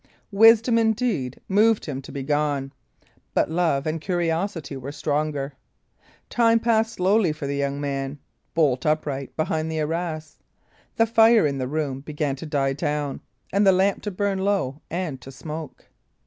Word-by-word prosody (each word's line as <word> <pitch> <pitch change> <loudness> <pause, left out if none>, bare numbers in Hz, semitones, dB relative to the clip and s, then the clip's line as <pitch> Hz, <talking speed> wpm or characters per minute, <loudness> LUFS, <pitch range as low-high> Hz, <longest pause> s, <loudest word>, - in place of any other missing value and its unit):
Wisdom, 225 +3 +6
indeed, 220 - 0
moved 215 +2 +3
him 135 -3 -4
to 135 - -11
be 140 -1 -5
gone; 145 -1 -1 0.6
but - - +2
love 160 -5 +1
and 155 0 -2
curiosity 170 -3 -2
were 135 +1 -6
stronger. 145 -1 -2 0.7
Time 230 -1 +3
passed 225 -1 +1
slowly 190 -2 +2
for 150 -1 -6
the 140 0 -2
young 140 0 -1
man, 140 0 -3 0.4
bolt 140 -6 +2
upright 145 -3 -1
behind 160 0 -1
the 160 - -3
arras. 155 0 -3 0.6
The 225 - +4
fire 225 -2 +5
in 140 -2 -1
the 130 - -2
room 140 -2 -2
began 150 -1 -2
to 160 - -7
die 135 -2 0
down, 145 -1 -2 0.3
and 200 +1 +3
the 195 - +7
lamp 190 +1 +2
to 210 - -3
burn 200 0 -1
low 190 -8 0
and 165 -7 -3
to 135 - -10
smoke. 150 +2 -8
155 Hz, 160 wpm, -24 LUFS, 140-195 Hz, 0.7 s, the